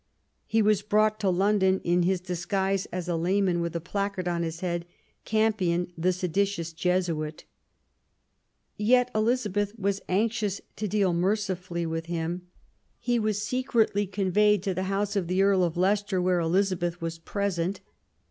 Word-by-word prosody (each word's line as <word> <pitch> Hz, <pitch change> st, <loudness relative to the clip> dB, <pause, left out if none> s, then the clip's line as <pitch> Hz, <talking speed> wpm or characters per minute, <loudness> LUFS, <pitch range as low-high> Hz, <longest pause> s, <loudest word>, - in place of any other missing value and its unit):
He 220 Hz, 0 st, +2 dB
was 210 Hz, -1 st, +3 dB
brought 215 Hz, +1 st, +2 dB
to 200 Hz, -, +1 dB
London 190 Hz, 0 st, +3 dB
in 175 Hz, +1 st, +2 dB
his 185 Hz, +1 st, +1 dB
dis 175 Hz, -1 st, -5 dB
guise 195 Hz, -1 st, 0 dB
as 180 Hz, 0 st, -5 dB
a 175 Hz, -, 0 dB
layman, 180 Hz, +1 st, +1 dB
with 170 Hz, 0 st, -3 dB
a -, -, 0 dB
placard 195 Hz, +1 st, -3 dB
on 170 Hz, -1 st, 0 dB
his 165 Hz, 0 st, -4 dB
head, 175 Hz, -1 st, -2 dB, 0.2 s
" -, -, -42 dB
Campion, 180 Hz, -6 st, +1 dB
the 175 Hz, +3 st, +1 dB
seditious 180 Hz, -1 st, -1 dB
Jesuit 165 Hz, -3 st, -1 dB, 0.7 s
". -, -, -48 dB
Yet 250 Hz, +3 st, +3 dB
Elizabeth 215 Hz, -2 st, 0 dB
was 200 Hz, -1 st, -1 dB
anxious 210 Hz, 0 st, 0 dB, 0.2 s
to 215 Hz, -, -2 dB
deal 195 Hz, -2 st, +1 dB
mercifully 185 Hz, -2 st, -1 dB
with 165 Hz, 0 st, -3 dB
him. 170 Hz, +1 st, -3 dB, 0.5 s
He 240 Hz, -1 st, +1 dB
was 215 Hz, -1 st, 0 dB
secretly 225 Hz, -4 st, +1 dB
conveyed 200 Hz, +1 st, +2 dB
to 195 Hz, -2 st, 0 dB
the 185 Hz, +1 st, -2 dB
house 200 Hz, +1 st, -1 dB
of 190 Hz, -4 st, 0 dB
the 185 Hz, +2 st, +2 dB
Earl 195 Hz, -2 st, +4 dB
of 170 Hz, -1 st, -1 dB
Leicester, 195 Hz, +1 st, +1 dB
where 180 Hz, 0 st, +2 dB
Elizabeth 175 Hz, 0 st, 0 dB
was 165 Hz, 0 st, -4 dB
present. 195 Hz, 0 st, -2 dB
190 Hz, 160 wpm, -27 LUFS, 175-205 Hz, 0.7 s, Earl